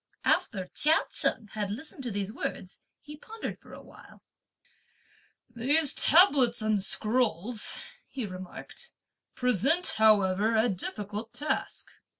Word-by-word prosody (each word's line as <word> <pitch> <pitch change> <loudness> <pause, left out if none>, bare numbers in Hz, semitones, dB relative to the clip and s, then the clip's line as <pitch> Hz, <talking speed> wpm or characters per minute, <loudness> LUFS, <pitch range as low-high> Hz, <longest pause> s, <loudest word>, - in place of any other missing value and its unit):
After 190 -5 0
Chia 315 +2 +4
Cheng 225 -5 0
had 210 -2 -4
listened 270 +7 -8
to 250 - -3
these 205 0 -4
words, - - -6 0.2
he 300 0 -12
pondered 450 +6 -8
for - - -18
a - - -12
while. - - -17 1.2
"These 270 +6 +3
tablets 275 -8 +5
and 215 -3 0
scrolls," 220 0 0 0.3
he 260 -5 -5
remarked, 185 - -10 0.4
"present 260 - +2
however 215 0 +3
a 220 +2 +2
difficult 210 +4 -5
task. 295 +5 -3
230 Hz, 120 wpm, -28 LUFS, 205-275 Hz, 1.2 s, tablets